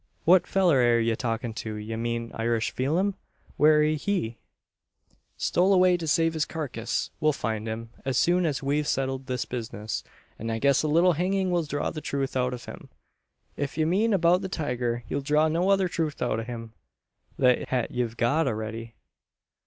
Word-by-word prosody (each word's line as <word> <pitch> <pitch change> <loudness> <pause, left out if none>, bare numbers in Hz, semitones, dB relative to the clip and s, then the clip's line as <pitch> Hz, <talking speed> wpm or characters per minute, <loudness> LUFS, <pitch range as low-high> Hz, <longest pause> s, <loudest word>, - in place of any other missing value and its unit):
"What 180 +2 +5
fellur 180 -7 +3
air 120 -1 +4
ye 115 0 +1
talkin' 115 0 -3
o'? 110 - -4
Ye 105 +1 -5
mean 115 0 -3
Irish 115 0 0
Pheelum? 170 +10 0 0.4
Where 150 0 +5
air 155 - +2
he?" 155 - -2 1.0
"Stole 190 +3 +3
away 185 -1 +5
to 170 -2 -4
save 165 +1 +2
his 160 -1 0
carcass. 130 -10 -3
We'll 155 -2 +3
find 110 -3 -3
him, 115 +1 -5
as 135 -2 -1
soon 175 +3 +3
as 145 -2 -2
we've 145 +2 0
settled 135 0 -1
this 125 -1 -2
business; 110 -3 -5 0.4
and 115 +1 -3
I 115 - -1
guess 140 +3 +3
a 155 - -1
little 170 +4 +4
hanging 185 +3 0
will 175 -1 +2
draw 145 0 -2
the 155 - -6
truth 135 -2 -3
out 125 0 +1
of 120 - -11
him." - - -10 0.7
"If 145 +1 -4
ye 155 - +2
mean 200 +8 +2
abeout 180 -1 +3
the 190 - -4
tiger, 125 -8 -2
ye'll 140 - -2
draw 150 +3 +3
no 170 +4 +1
other 195 -1 +3
truth 160 -3 -2
out 120 -3 0
o' - - -3
him 115 -1 -7 0.6
than 125 -1 +3
hat 125 -3 -1
ye've 120 -2 -2
got 140 +6 +2
a'ready. 115 0 -4
140 Hz, 185 wpm, -26 LUFS, 115-165 Hz, 1.0 s, What